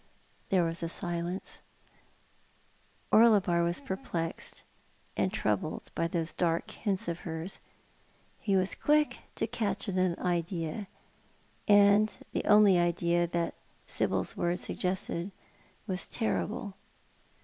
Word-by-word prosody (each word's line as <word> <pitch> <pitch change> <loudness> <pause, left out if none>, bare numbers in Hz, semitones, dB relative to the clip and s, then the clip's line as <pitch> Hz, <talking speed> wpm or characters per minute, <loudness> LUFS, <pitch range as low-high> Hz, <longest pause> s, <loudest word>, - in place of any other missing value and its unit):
There 185 -2 +3
was 165 +2 0
a 165 - -2
silence. 175 +1 -3 1.5
Orlebar 200 -6 +5
was 170 +1 0
perplexed 180 -9 -2 0.5
and - - +1
troubled - - -2
by 165 - 0
those 165 -1 -2
dark 170 +4 0
hints 200 -4 -2
of 170 0 -2
hers. 165 +2 -4 0.8
He 200 -3 +1
was 185 0 +2
quick 300 0 +2 0.2
to - - 0
catch 205 -1 -2
at 190 -2 -2
an 185 -2 +2
idea 175 +1 -2 0.4
— - - -34
and 205 +1 +5
the - - -2
only 205 -3 +6
idea 175 0 +2
that 170 0 -1 0.3
Sibyl's - - -1
words 175 +1 -1
suggested 185 0 -2 0.5
was 185 -5 -2
terrible. 105 - -2
180 Hz, 115 wpm, -30 LUFS, 170-200 Hz, 1.5 s, only